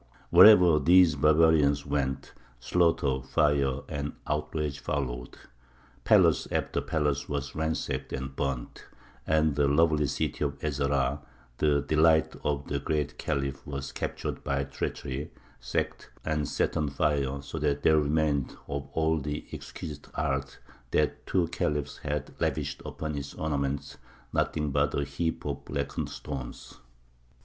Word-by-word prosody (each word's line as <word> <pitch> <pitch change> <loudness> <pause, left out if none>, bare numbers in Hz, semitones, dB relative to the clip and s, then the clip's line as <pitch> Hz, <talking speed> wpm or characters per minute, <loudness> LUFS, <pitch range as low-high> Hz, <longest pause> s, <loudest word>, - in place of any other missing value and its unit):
Wherever 90 -7 +8
these 85 +2 +6
barbarians 75 -1 +4
went, 70 -2 -2 0.3
slaughter, 70 -4 +2
fire 70 -1 +1
and 70 -1 -4
outrage 75 -1 -2
followed. 60 -3 -3 0.7
Palace - - +5
after - - -1
palace 75 -3 -1
was 70 -2 -3
ransacked 80 0 -2
and 65 0 -5
burnt, 70 -3 -3 0.4
and 80 -1 +3
the 70 -1 +3
lovely 75 0 +3
city - - -2
of 70 -1 -2
Ez 75 -2 -2
Zahrā, 70 0 +1 0.4
the 75 -2 +3
delight 80 +1 +3
of 70 -1 -1
the 70 - -1
Great 75 0 -2
Khalif, 70 0 -2
was 70 -1 -5
captured - - -4
by 70 -1 0
treachery, 70 +1 -4 0.3
sacked, - - -3 0.2
and 75 -2 0
set - - 0
on 75 -2 0
fire, 70 -1 0
so - - -6
that 75 -1 0
there 80 -1 +5
remained 75 -2 0
of 70 0 -4
all 80 0 +1
the 75 +1 -4
exquisite 75 -2 -8
art 70 -2 -2 0.3
that 75 +3 0
two 90 -3 +2
khalifs 75 -3 -2
had 75 0 -3
lavished - - -1
upon 75 -1 -4
its 70 -1 -6
ornament 70 -3 -2 0.4
nothing 75 -2 0
but 70 0 +1
a - - 0
heap 70 +4 -3
of 70 -1 -3
blackened 70 0 -3
stones. 65 -4 -7
70 Hz, 135 wpm, -28 LUFS, 70-75 Hz, 0.7 s, Wherever